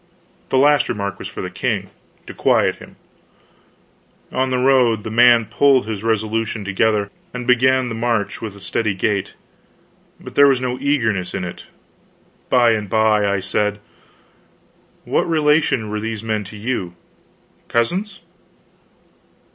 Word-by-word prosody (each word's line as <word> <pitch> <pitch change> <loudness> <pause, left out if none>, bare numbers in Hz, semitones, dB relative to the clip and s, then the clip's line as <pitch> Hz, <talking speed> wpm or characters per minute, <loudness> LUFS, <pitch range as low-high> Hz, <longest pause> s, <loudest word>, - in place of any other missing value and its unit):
The - - +1
last 145 0 +4
remark 100 -3 -3
was - - -6
for - - -7
the - - -5
king - - -2 0.3
to - - -9
quiet - - +2
him. - - -14 1.4
On 130 0 0
the 130 - 0
road 125 -4 +3
the 110 - -6
man 120 0 +5
pulled 135 +2 +3
his 110 -2 -5
resolution 110 -1 -1
together, 100 +1 0 0.2
and 125 -1 -5
began 130 +1 +3
the 120 - -4
march 115 -3 -2
with 110 -3 -6
a 100 - -14
steady 105 -1 -1
gait, 100 0 -2 0.8
but - - -11
there 145 0 +6
was 135 -2 +3
no 125 0 -3
eagerness 115 -10 0
in - - -3
it. 90 - -8 0.8
By 120 -2 +4
and 105 -3 -2
by 110 -1 +2
I 100 -1 -1
said: 105 +2 -1 1.3
"What - - 0
relation 150 -8 +2
were 105 - -2
these 110 0 -5
men 110 -2 -2
to 105 +3 -10
you 100 -6 -3 0.7
cousins?" 185 - -1
115 Hz, 145 wpm, -19 LUFS, 105-130 Hz, 1.4 s, there